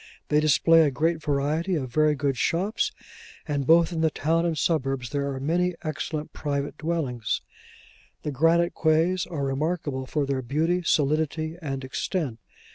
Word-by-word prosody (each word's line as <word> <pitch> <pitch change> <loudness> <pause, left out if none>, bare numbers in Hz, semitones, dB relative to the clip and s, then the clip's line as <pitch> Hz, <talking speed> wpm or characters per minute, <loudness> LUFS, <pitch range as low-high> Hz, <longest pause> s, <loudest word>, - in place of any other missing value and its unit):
They 150 - +4
display 165 +2 +5
a 155 - +4
great 160 +4 0
variety 150 +5 0
of 130 -6 -4
very 155 +1 +3
good 140 -1 0
shops; 185 - 0 0.6
and 140 -3 -1
both 170 +1 +5
in 160 - -1
the 160 - +4
town 165 +3 0
and 165 -2 -1
suburbs 135 -6 0
there 140 -1 -1
are 135 - -4
many 175 +5 0
excellent 155 0 -4
private 145 -1 -3
dwellings. 155 -9 -2 0.8
The 150 - -2
granite 165 +5 +3
quays 165 +3 +2
are 150 -5 -4
remarkable 140 -1 -2
for 150 0 0
their 135 -1 -1
beauty, 160 +8 0
solidity, 155 0 0
and 135 -3 -4
extent. 130 - -3
155 Hz, 155 wpm, -26 LUFS, 140-165 Hz, 0.8 s, display